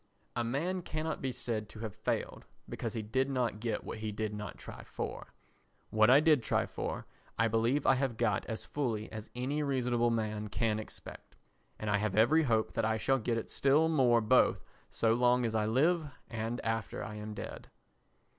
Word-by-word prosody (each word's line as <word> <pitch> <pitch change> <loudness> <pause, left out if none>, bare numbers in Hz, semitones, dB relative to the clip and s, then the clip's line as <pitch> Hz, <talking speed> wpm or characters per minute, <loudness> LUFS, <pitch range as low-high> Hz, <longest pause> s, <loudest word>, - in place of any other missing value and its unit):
A 120 - 0
man 160 +10 -1
cannot 155 -1 -3
be 130 - -1
said 110 -4 -3
to 110 - -10
have 110 -3 -4
failed, - - -3 0.2
because 115 -2 -4
he 110 - -2
did 130 +6 0
not 125 -5 0
get 115 0 -2
what - - -6
he 110 0 -3
did 105 0 -3
not 105 -1 -6
try - - -9
for. - - -6 0.6
What 110 +1 +5
I 135 +3 +8
did 155 -3 +4
try - - +1
for - - -4 0.3
I 115 - +3
believe 115 +6 +1
I - - +6
have 130 -3 -1
got 120 - +1
as 110 - -4
fully 115 -7 -2
as 110 0 -7
any 135 +5 -1
reasonable 125 -4 +1
man 110 -2 -1
can 110 +1 0
expect, 110 - -10 0.4
and 110 - -5
I 105 0 +3
have 105 -1 -1
every 125 +10 +5
hope 115 -7 +1
that 115 - 0
I 110 0 +1
shall 135 +4 +2
get 115 0 0
it 115 - -5
still 145 +4 +3
more 125 -7 +4
both 120 +4 +4 0.3
so 115 -1 +2
long 125 +1 +3
as 115 - -1
I 110 -1 +1
live 155 +8 +2 0.2
and 115 +1 -3
after 115 0 -2
I 105 - -6
am 105 0 -6
dead. - - -7
115 Hz, 195 wpm, -32 LUFS, 110-130 Hz, 0.6 s, I